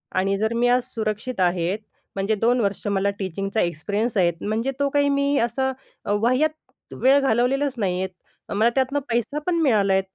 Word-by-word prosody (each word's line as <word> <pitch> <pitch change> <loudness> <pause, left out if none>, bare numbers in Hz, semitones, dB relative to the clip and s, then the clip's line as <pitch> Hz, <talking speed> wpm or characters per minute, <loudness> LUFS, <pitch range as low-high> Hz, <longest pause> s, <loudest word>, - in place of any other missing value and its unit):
आणि 195 +1 +1
जर 220 +2 0
मी 240 +1 +2
आज 250 0 +3
सुरक्षित 220 +1 -3
आहे, 175 0 +1 0.4
म्हणजे 195 +3 0
2 235 +4 +2
वर्ष 200 -2 -2
मला 200 0 +1
टीचिंगचा 195 +3 -2
एक्सपिरियन्स 205 +7 -1
आहे, 175 -2 +4
म्हणजे 225 +5 -1
तो 280 0 +2
काही 285 0 +2
मी 280 0 +1
असा 265 +3 0 0.3
अ, - - -1
वाह्यात 290 +7 -1
वेळ 270 +2 +6
घालवलेलाच 270 +2 +1
नाहीये. 185 -3 -1 0.4
मला 215 +3 +3
त्यातनं 270 +2 +1
पैसा 240 +5 -1
पण 360 - +2
मिळाला 210 -9 +3
आहे. 190 - +3
225 Hz, 170 wpm, -23 LUFS, 195-265 Hz, 0.4 s, वेळ